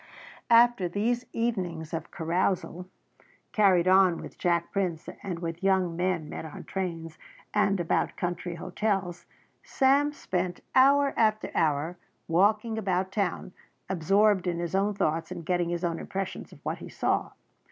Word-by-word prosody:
After 235 -5 +5
these 235 +6 -1
evenings 180 -9 -2
of 165 0 -4
carousal, 180 +1 -1 0.6
carried 185 -4 +4
on 185 -2 +5
with - - -9
Jack 170 -1 +1
Prince 180 -5 -2
and 185 -4 -4
with 170 0 -5
young 190 -3 +2
men 175 -3 -1
met - - -6
on 160 - -8
trains 165 -4 -5 0.3
and 200 -2 +2
about 170 - 0
country 175 0 -3
hotels, 185 0 -2 0.3
Sam 280 +2 +2
spent 180 -10 -3
hour 275 +2 +5
after 215 -1 +1
hour 155 +3 0 0.3
walking 210 +6 +2
about 190 -2 -1
town 190 -2 -2 0.4
absorbed 195 +2 +3
in 175 -1 0
his 170 0 -4
own 200 +2 +1
thoughts 165 -3 0
and 175 -3 -7
getting 175 -1 0
his 175 0 -3
own 170 -1 -1
impressions 195 0 -5
of - - -15
what - - -2
he - - -9
saw. - - -1
185 Hz, 145 wpm, -28 LUFS, 170-205 Hz, 0.6 s, After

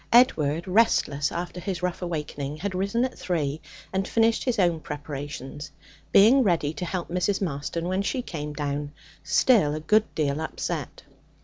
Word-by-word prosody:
Edward, 170 - +4
restless 180 -8 +2
after 175 +1 -4
his 180 -1 -4
rough 180 0 -2
awakening, 150 -4 -4
had 190 +4 -3
risen 200 +6 +1
at 260 - -5
three 155 -4 -1 0.3
and 190 0 0
finished 225 0 +2
his 250 -3 0
own 175 -4 +2
preparations, 145 -1 -6 0.4
being 230 +7 +7
ready 170 - +1
to 180 - -4
help 175 0 -3
Mrs. 180 +3 0
Marston 165 0 -3
when 185 +2 0
she 250 +5 -1
came 150 -8 -5
down, 145 0 -3 0.3
still 155 - +4
a - - -3
good 210 +8 +3
deal 150 -1 0
upset. 160 - -4
170 Hz, 155 wpm, -26 LUFS, 150-195 Hz, 0.4 s, being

